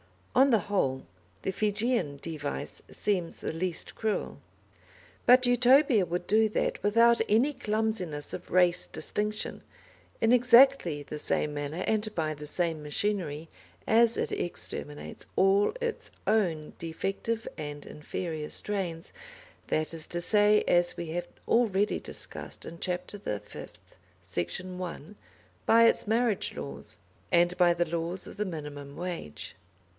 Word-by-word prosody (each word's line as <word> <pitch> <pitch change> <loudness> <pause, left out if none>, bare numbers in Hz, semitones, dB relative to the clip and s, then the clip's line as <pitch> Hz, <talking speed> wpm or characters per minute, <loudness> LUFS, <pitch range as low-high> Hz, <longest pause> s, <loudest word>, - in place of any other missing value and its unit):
On 270 +2 +5
the 225 -4 +4
whole, 155 -10 -1 0.4
the - - 0
Fijian 205 - 0
device 155 -3 -5
seems 180 -5 -2
the - - -3
least 170 +1 -2
cruel. 220 -2 -2 0.9
But 250 +1 +7
Utopia 245 -2 +5
would 175 +1 -3
do 220 +1 +3
that - - -1
without 230 +3 +5
any 240 +8 +3
clumsiness 210 - -2
of - - -7
race 180 0 +3
distinction, 210 +1 -2 0.6
in 225 - +3
exactly 245 - +5
the 150 - -6
same 150 0 +1
manner, 145 +5 -3
and 215 -1 0
by 155 -2 0
the 150 0 -8
same 165 -1 0
machinery, 160 -1 -2 0.4
as 230 +1 +4
it - - -1
exterminates 150 -3 -5
all 195 - +4
its 475 -2 -3 0.2
own 175 -8 +1
defective 195 +7 -3
and 145 -1 -6
inferior 155 0 -5
strains; 180 -5 -3 0.6
that 155 +1 -1
is 160 -1 -2
to 175 - -2
say, 210 +3 +4
as 175 0 +3
we 170 - -4
have 175 +2 -3 0.2
already 210 -3 +2
discussed - - -6
in 165 - -9
Chapter 180 +2 -3
the 105 - -3
Fifth, - - -12 0.3
section 95 - -4
1, 180 +1 -7 0.5
by 230 +1 +7
its 230 - +3
marriage 225 -1 +1
laws, - - -6 0.3
and 175 0 +4
by 175 -1 +5
the 175 0 0
laws 170 +3 -2
of - - -10
the 210 - -1
minimum 145 -5 -7
wage. 175 - -6
185 Hz, 135 wpm, -29 LUFS, 160-220 Hz, 0.9 s, But